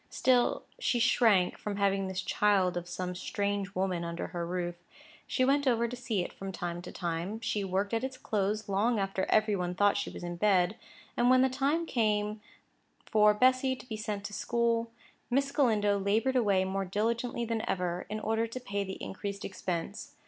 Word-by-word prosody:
Still 250 -2 +2 0.2
she 260 - +1
shrank 225 -5 +3
from 210 -1 -4
having 195 -1 +1
this 190 0 -3
child 190 -3 +2
of 175 0 -4
some 180 0 -4
strange 200 +1 -2
woman 185 -2 0
under 170 0 -4
her 170 -1 -4
roof. 175 0 -2 0.5
She 255 - +2
went 280 +1 +2
over 235 -2 +3
to 245 - -5
see 230 -6 -1
it - - -7
from 195 0 -6
time 175 -1 -4
to - - -9
time; 175 +5 -3
she 215 -3 -1
worked 195 +3 -1
at 225 +2 0
its 265 0 -4
clothes 210 -1 -1
long 210 +4 +1
after 195 -1 -1
every 215 -1 +3
one 180 -1 -2
thought 205 +2 +3
she 205 - -2
was - - -9
in 175 0 -4
bed; 190 0 +3 0.4
and, 240 +1 +3
when 255 0 +6
the 265 - +3
time 280 +6 0
came 215 -5 0 0.6
for 210 -1 +4
Bessy 255 +3 +3
to 250 - -13
be 220 - -4
sent 210 -1 -4
to 205 - -6
school, 230 +1 0 0.4
Miss 275 +2 +1
Galindo 210 -8 +2
laboured 220 +7 +1
away 200 -6 +3
more 195 +1 -1
diligently 235 +5 -1
than 225 -1 -1
ever, 180 -1 -2
in 215 +1 -3
order 225 +1 0
to 230 +3 -6
pay 200 -5 -3
the 190 -1 -5
increased 200 0 -5
expense. 170 -3 -4
205 Hz, 190 wpm, -30 LUFS, 190-235 Hz, 0.6 s, when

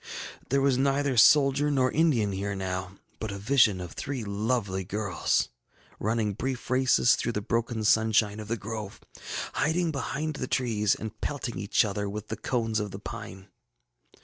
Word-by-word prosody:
ŌĆ£There 135 +1 +2
was 135 -2 +3
neither 140 0 +1
soldier 140 +4 +5
nor 130 -3 +2
Indian 140 -11 +2
here 100 +1 -3
now, 95 -1 -4 0.3
but 110 - -3
a 100 - -5
vision 110 -2 +3
of 90 -2 -6
three 135 -5 -4
lovely 100 -2 -1
girls, 100 0 0 0.5
running 110 -1 0
brief 130 +4 -4
races 130 -1 +4
through 120 - -2
the 105 - -1
broken 115 +1 -1
sunshine 110 -1 +3
of 105 - -7
the 115 +2 -1
grove, 110 -1 -6 0.5
hiding 165 +2 +1
behind 150 +2 -3
the 130 - -3
trees, 110 -6 +1
and 110 0 -8
pelting 135 -5 -3
each 100 +2 +2
other 100 0 -2
with 105 +1 -6
the 110 - -2
cones 115 0 -1
of 105 -1 -3
the 95 - -7
pine. 105 -2 -8
110 Hz, 165 wpm, -28 LUFS, 100-130 Hz, 0.5 s, soldier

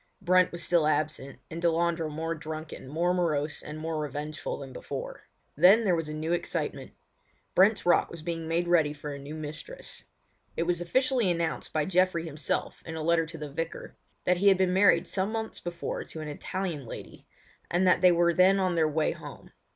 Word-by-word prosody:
Brent 185 -1 +4
was 170 0 -5
still 170 -3 +3
absent, 150 -2 -1
and 165 +1 -5
Delandre 170 -1 +1
more 160 +2 -3
drunken, 155 -3 -7
more 170 +6 +1
morose, 155 -4 0
and 150 0 -7
more 160 0 -3
revengeful 150 +1 -4
than 135 -2 -9
before. - - -7 0.3
Then 205 +6 +6
there 180 -3 +3
was 165 -2 -3
a - - -4
new 160 +2 -1
excitement. 175 - -3 0.6
Brent's 200 +2 +4
Rock 175 - +4
was 170 -2 -9
being 165 -1 -3
made 170 +2 0
ready 160 -4 +3
for 145 0 -6
a 140 - -7
new 145 +3 -8
mistress. 155 - -8 0.5
It - - +2
was 175 0 0
officially 255 +3 +2
announced 170 -2 -2
by 155 -1 0
Geoffrey 185 -2 +2
himself 150 -3 -3
in 160 - -7
a 160 - -4
letter 165 0 +2
to 165 0 -8
the 150 -2 -7
Vicar, 165 +3 -5 0.3
that 180 - +3
he 200 +3 +2
had 195 -2 +7
been 185 -1 +2
married 195 +2 +5
some 195 +2 -1
months 220 -1 -4
before 175 0 -4
to 160 - -8
an 155 - -5
Italian 155 -2 -4
lady, - - -10 0.4
and 180 +2 +2
that 180 -1 +4
they 180 -1 +7
were 170 0 +3
then 185 +3 +5
on 185 -2 +1
their 160 -2 +2
way 155 +1 +1
home. - - -10
170 Hz, 195 wpm, -28 LUFS, 155-180 Hz, 0.6 s, had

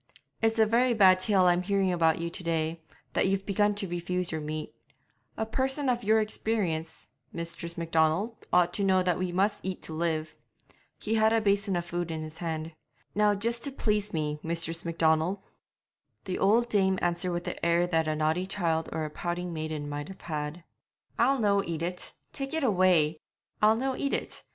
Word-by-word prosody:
'It's 225 0 +2
a 220 - +6
very 235 +3 +3
bad 190 -3 +6
tale 190 -1 +3
I'm 175 0 +4
hearing 195 0 +1
about 165 -2 +3
you 170 0 -3
to 180 - -5
day, 165 0 -1 0.3
that - - +2
you've 195 0 0
begun 205 +1 +2
to 205 -1 -2
refuse 175 +1 -3
your 160 -1 -3
meat. 155 +1 -5 0.6
A 220 - -1
person 265 +4 0
of 240 -1 0
your 220 +2 +4
experience, 205 -7 -2 0.2
Mistress 170 0 -5
Macdonald, 165 +6 0
ought 175 -1 +4
to 200 - -1
know 190 -1 +3
that 180 -2 +1
we 185 -1 -1
must 195 +4 0
eat 190 -1 -4
to 160 - -7
live.' 160 -1 -1 0.6
He 220 - -3
had 220 0 +4
a 225 - +4
basin 200 -2 +1
of 175 0 -1
food 175 0 -3
in 160 -1 -4
his 155 +1 -8
hand. 160 -1 -3 0.4
'Now 210 0 +3
just 235 +4 -1
to 280 - -2
please 210 -5 0
me, 150 -2 -2
Mistress 165 0 -2
Macdonald.' 165 +2 +1 0.9
The 185 - -3
old 225 +5 +4
dame 190 -4 +2
answered 175 +1 0
with 175 0 -2
the 180 - -6
air 170 +1 +3
that 165 -2 +1
a 155 - 0
naughty 155 +4 0
child 165 -5 -1
or 160 - -2
a 150 - -6
pouting 175 +2 -3
maiden 155 -2 -4
might 145 0 -5
have 190 - -11
had. 155 +1 -4 0.6
'I'll 270 +4 +4
no 200 -4 +3
eat 165 -1 -4
it 180 +1 -4 0.2
tak' 275 +3 -4
it 320 - 0
away! 180 - +3 0.4
I'll 215 +1 +6
no 260 +3 -1
eat 280 +1 -1
it. - - -5
180 Hz, 195 wpm, -28 LUFS, 165-210 Hz, 0.9 s, a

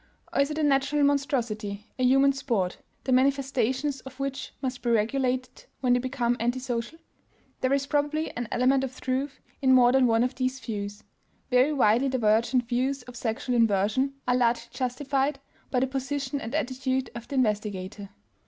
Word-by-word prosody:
or - - +3
is 280 - +1
it 305 - -4
a 315 - 0
natural 285 +1 +2
monstrosity, 235 -8 0
a - - +1
human 270 +2 +5
"sport," 230 -9 -1 0.2
the 265 - -2
manifestations 265 0 +1
of 265 0 -12
which 275 0 -4
must 255 -2 -4
be 240 - -1
regulated 255 +3 0 0.2
when 250 -2 +3
they 245 - +3
become 245 -1 0
antisocial? 245 +3 -2 0.6
There 255 - 0
is 275 0 +2
probably 295 +2 -1
an 240 -1 -3
element 260 +2 +3
of 260 -1 -5
truth 265 +2 -2 0.2
in 260 -1 +5
more 245 -1 +6
than 260 -1 +4
one 225 0 +3
of 250 +1 -1
these 255 0 -2
views. 205 -3 -5 0.5
Very 250 +4 +4
widely 255 -1 +3
divergent 235 0 +2
views 260 +2 -1
of 245 0 -12
sexual 235 +2 -2
inversion 230 +5 +2
are 250 - +3
largely 240 -1 +1
justified 270 +2 -1 0.3
by 255 - +1
the - - +3
position 275 +1 -3
and 230 +6 -5
attitude 260 -2 -1
of 235 -1 -8
the 280 - -5
investigator. 205 -4 -1
255 Hz, 170 wpm, -27 LUFS, 235-275 Hz, 0.6 s, more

